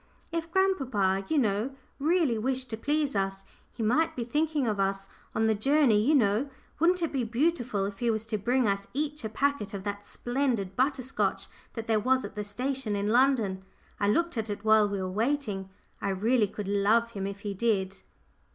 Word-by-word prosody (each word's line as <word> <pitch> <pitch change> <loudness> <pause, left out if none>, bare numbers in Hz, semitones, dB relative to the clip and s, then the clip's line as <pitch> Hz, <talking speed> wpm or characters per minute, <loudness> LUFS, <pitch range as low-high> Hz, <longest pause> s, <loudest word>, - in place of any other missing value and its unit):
"If 335 -1 -2
he - - -23
grandpapa, 255 - +1
you 315 - +3
know 225 +1 +1 0.2
really 315 -4 +2
wished 255 +2 -2
to - - -1
please 290 +4 0
us 195 0 -1 0.3
he 230 - -5
might 320 +9 +2
be 245 - -2
thinking 295 +3 0
of 210 -3 -1
us 195 0 0 0.3
on 220 - +2
the 220 - +4
journey, 265 0 +3
you 290 +8 +3
know 225 +2 +2 0.3
wouldn't 350 +2 +3
it 330 - 0
be 265 -3 0
beautiful 240 -4 0
if 200 0 -6
he 240 - +1
was 220 -1 0
to 220 -1 -2
bring 245 +3 +2
us 200 0 -1
each 300 -1 -2
a 220 - -2
packet 275 -3 -1
of 190 - -6
that 205 0 -5
splendid 240 -7 -1
butter 265 +1 +1
scotch 260 - -1 0.3
that 225 -2 -5
there 220 -2 +2
was 260 +4 +2
at - - -8
the 210 0 -4
station 245 +2 -2
in 200 +1 -1
London? 230 -6 +2 0.4
I 200 - +1
looked 335 +5 +1
at 220 0 -3
it 205 +1 -5
while 215 -1 +5
we 200 -1 -2
were 185 - -2
waiting. 210 -2 -1 0.3
I - - -1
really 215 +4 +2
could 205 0 -6
love 210 +4 +2
him 195 -3 -3
if 200 0 -7
he 205 -1 -3
did." 195 -2 0
225 Hz, 205 wpm, -28 LUFS, 200-275 Hz, 0.4 s, while